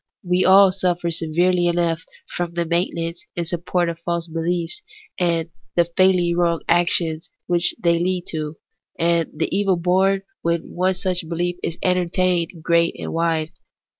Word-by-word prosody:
We 180 0 +1
all 195 0 +7
sufier 175 -2 0
severely 175 +2 +1
enough 170 -1 0 0.3
from 175 -1 -3
the 170 0 0
maintenance 170 0 -2
and 170 - -1
support 175 +1 -1
of 165 -1 -4
false 170 0 -2
beliefs 170 - -1 0.4
and 170 -2 0 0.2
the 170 -1 +2
fatally 185 -2 +3
wrong 170 -1 +1
actions 170 -2 +1 0.2
which 175 0 +2
they 170 -1 +3
lead 180 0 -1
to, 155 -1 -4 0.4
and 170 -1 +1
the 160 +4 -2
evil 195 -2 +2
born 190 +3 +2 0.2
when 170 0 -2
one 185 +1 +1
such 180 -3 -1
belief 175 +1 -2
is 165 - -3
entertained 180 -1 +1
is 165 -3 -15
great 170 0 +2
and - - -5
wide. 165 -1 0
170 Hz, 155 wpm, -21 LUFS, 165-180 Hz, 0.4 s, all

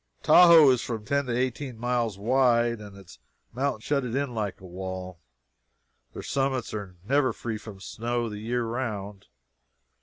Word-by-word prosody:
Tahoe 170 -5 +8
is 125 -2 +1
from 110 -3 -5
ten 140 +2 0
to 120 -1 -1
eighteen 130 0 -2
miles 120 -3 -1
wide, 120 +1 +2
and 100 -1 -11
its 95 -3 -15 0.3
mountains 130 -3 -2
shut 140 -2 0
it 120 -1 -4
in 140 -2 -1
like 105 -4 -3
a 95 - -13
wall. 95 -1 -7 0.9
Their - - -7
summits 135 -4 -1
are 100 -4 -6
never 140 0 +3
free 110 -2 -5
from 105 -3 -11
snow 120 +3 -3
the 105 -2 -6
year 120 +3 -1
round. 105 -5 -5
120 Hz, 160 wpm, -26 LUFS, 105-130 Hz, 0.9 s, Tahoe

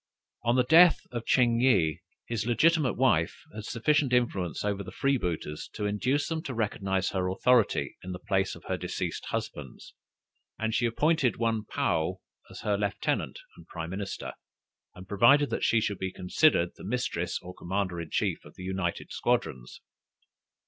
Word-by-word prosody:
On 120 +1 +2
the 125 - +4
death 165 +6 +6
of 120 -2 -5
Ching 120 -2 +3
yih, 100 -12 +3 0.3
his 115 -1 -3
legitimate 150 +3 +3
wife 110 -11 +1
had 105 0 -7
sufficient 135 +3 +1
influence 100 -9 0
over 100 -1 -1
the - - -9
freebooters 90 - -2
to 105 - -3
induce 125 +8 0
them 160 -1 -2
to 130 - -4
recognize 95 -4 -1
her 95 -2 -1
authority 120 +4 +2
in 95 - -7
the 90 - -4
place 95 +1 -1
of - - -14
her - - -2
deceased - - -4
husband's, - - -6 0.6
and 110 0 -1
she 120 +1 +2
appointed 145 +2 +1
one 115 -2 0
Paou 85 +2 0 0.3
as - - -10
her 105 -1 0
lieutenant 100 -1 -2
and 85 - -15
prime 85 0 -6
minister, 95 +1 -5 0.6
and 90 +1 -11
provided 125 +9 +4
that - - -2
she 115 - +4
should 105 -2 -2
be 95 0 -3
considered 90 - +2
the - - -11
mistress 95 -6 -2
or 90 0 -10
commander 90 -1 -3
in 80 - -8
chief - - -1
of - - -15
the 90 - -9
united 95 -2 -3
squadrons. - - -2
105 Hz, 165 wpm, -28 LUFS, 90-125 Hz, 0.6 s, death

